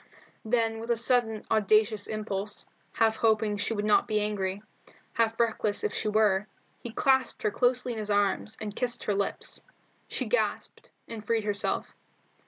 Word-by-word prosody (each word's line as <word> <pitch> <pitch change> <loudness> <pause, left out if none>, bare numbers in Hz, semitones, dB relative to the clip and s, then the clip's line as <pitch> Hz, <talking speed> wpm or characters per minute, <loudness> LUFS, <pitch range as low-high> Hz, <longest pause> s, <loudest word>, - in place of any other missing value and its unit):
Then 225 0 0
with 230 +1 -7
a 235 - +2
sudden, 230 -2 +1
audacious 215 0 +3
impulse, 210 -1 -4 0.3
half 220 -1 +2
hoping 215 -2 +2
she 215 +3 -1
would 205 0 -2
not 210 - +4
be 215 -1 +1
angry, 205 -1 -2 0.5
half 225 0 +1
reckless 220 -3 +1
if 210 - -1
she - - -1
were, 210 -2 +2 0.3
he 240 - -6
clasped 265 +2 +1
her 210 - +2
closely 250 +1 +1
in 225 - -5
his 210 -1 -3
arms, 205 +1 +1
and 210 -1 -5
kissed 245 -1 -1
her 210 - 0
lips. 200 0 -3 0.4
She - - -1
gasped, - - -2 0.2
and 225 -2 -7
freed 225 0 0
herself. 205 0 -1
215 Hz, 165 wpm, -28 LUFS, 210-230 Hz, 0.5 s, not